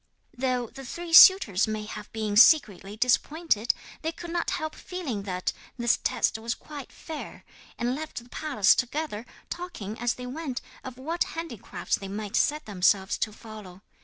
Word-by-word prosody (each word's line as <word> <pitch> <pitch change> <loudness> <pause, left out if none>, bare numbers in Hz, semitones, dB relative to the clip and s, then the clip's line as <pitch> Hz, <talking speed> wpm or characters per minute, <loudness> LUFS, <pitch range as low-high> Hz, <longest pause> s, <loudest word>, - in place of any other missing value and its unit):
'Though 250 -1 0
the 270 +4 -11
three 340 +6 -7
suitors 235 - +8
may 215 -1 -3
have 210 0 -8
been 215 -2 -2
secretly 210 - +5
disappointed, 250 0 +2 0.3
they 320 - -1
could 340 +1 -9
not 345 0 -1
help 315 0 -3
feeling 305 - -5
that 185 -2 -3 0.2
this 240 -1 +2
test - - 0
was 230 +1 -2
quite 290 -3 -10
fair, 315 -2 -8 0.3
and 240 +1 0
left 310 +3 -6
the - - -18
palace 270 -9 +3
together, 250 -3 -3 0.2
talking 235 - -6
as 240 0 0
they 250 - -8
went 265 0 -4 0.2
of 255 -1 -8
what 325 +6 -1
handicrafts 325 - -3
they 195 - -8
might 205 +2 -5
set 300 +1 +1
themselves 190 0 +2
to 215 - -1
follow. 210 -4 -12
245 Hz, 160 wpm, -27 LUFS, 210-310 Hz, 0.3 s, suitors